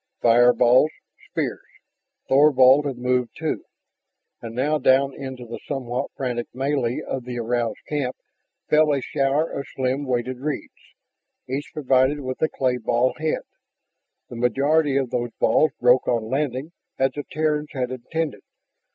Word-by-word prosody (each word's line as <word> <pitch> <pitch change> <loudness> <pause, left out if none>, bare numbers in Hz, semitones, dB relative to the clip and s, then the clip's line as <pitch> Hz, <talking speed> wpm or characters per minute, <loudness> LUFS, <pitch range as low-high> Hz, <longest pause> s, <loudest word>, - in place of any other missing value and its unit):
Fireballs, 120 +3 +5 0.4
spears.... - - -2 0.7
Thorvald 135 0 +5
had 135 -3 -4
moved 125 -1 -1
too. - - -3 0.8
And 115 -1 -7
now 150 +5 +1
down 135 +1 +3
into 130 -3 -7
the 120 0 -7
somewhat 125 -3 -3
frantic 120 -3 -2
melee 130 -2 -1
of 130 - -4
the 125 0 -6
aroused 120 -1 -2
camp 140 -4 -2 0.5
fell 150 -1 +4
a - - 0
shower 140 +3 0
of 140 - -5
slim 130 +2 -1
weighted 125 0 -2
reeds, 145 +1 -4 0.7
each 135 +3 -4
provided 135 0 +2
with 130 -1 -5
a 160 - +3
clay 125 -2 0
ball 120 +2 +1
head. 155 0 -1 0.8
The 120 - -9
majority 140 +4 +2
of 135 -3 -1
those 120 -1 -2
balls 155 - +4
broke 125 +1 +4
on 115 -1 -1
landing 135 +2 -2 0.3
as 135 0 +2
the 145 +2 -5
Terrans 150 -1 -1
had 125 -2 -2
intended. 150 +5 -3
130 Hz, 140 wpm, -23 LUFS, 125-145 Hz, 0.8 s, Fireballs